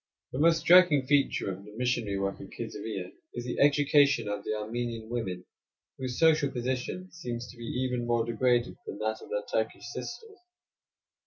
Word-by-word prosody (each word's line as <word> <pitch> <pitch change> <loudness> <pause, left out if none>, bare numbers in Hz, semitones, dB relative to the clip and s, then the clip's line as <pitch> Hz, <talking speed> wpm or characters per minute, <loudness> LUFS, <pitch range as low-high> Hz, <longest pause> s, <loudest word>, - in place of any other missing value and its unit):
The 130 - -4
most 165 +1 +4
striking 170 -5 +6
feature 140 -7 +2
of 95 +1 -8
the 105 +1 -13
missionary 120 -5 0
work 100 0 -2
at - - -9
Kaisarieh 95 -5 -5 0.2
is 120 0 -4
the 125 - -3
education 145 -2 +4
of 105 -1 -3
the 110 - -2
Armenian 115 +1 -4
women, 95 -7 -3 0.5
whose 130 -2 -3
social 155 -3 +4
position 130 +9 -3
seems 120 -8 -5
to - - -16
be 120 - -8
even 125 0 -2
more 120 -1 +2
degraded 120 +1 +1
than - - -5
that 110 +1 -2
of - - -12
their 105 0 -1
Turkish 110 +1 -2
sisters. 380 - -7
120 Hz, 170 wpm, -29 LUFS, 110-140 Hz, 0.5 s, striking